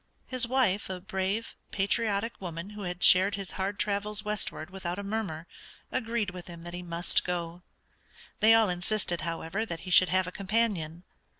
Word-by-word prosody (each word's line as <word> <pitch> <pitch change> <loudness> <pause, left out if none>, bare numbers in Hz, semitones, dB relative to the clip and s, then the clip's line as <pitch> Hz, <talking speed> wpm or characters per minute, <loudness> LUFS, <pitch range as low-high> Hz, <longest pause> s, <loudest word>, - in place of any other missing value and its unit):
His 255 -2 +2
wife, 235 -7 +1
a 185 -1 -4
brave, 195 +3 -2
patriotic 205 +2 0
woman 170 +2 -5
who 210 0 -8
had 180 -2 -4
shared 190 +2 +6
his 195 -2 -6
hard 195 +2 -2
travels 210 +1 -1
westward 200 -5 -2
without 185 -2 -4
a 200 - -4
murmur, 200 -6 -3 0.5
agreed 230 -4 -1
with 180 -1 -9
him 170 -1 -10
that 175 0 -8
he 180 - -5
must 170 0 +2
go. 175 -1 -3 0.8
They 225 +1 +7
all 225 -1 +5
insisted, 180 0 0
however, 165 +4 -2
that 170 -7 -5
he 185 - -7
should 185 0 +7
have 185 0 +2
a 180 - -5
companion. 195 -5 -1
190 Hz, 175 wpm, -29 LUFS, 175-210 Hz, 0.8 s, They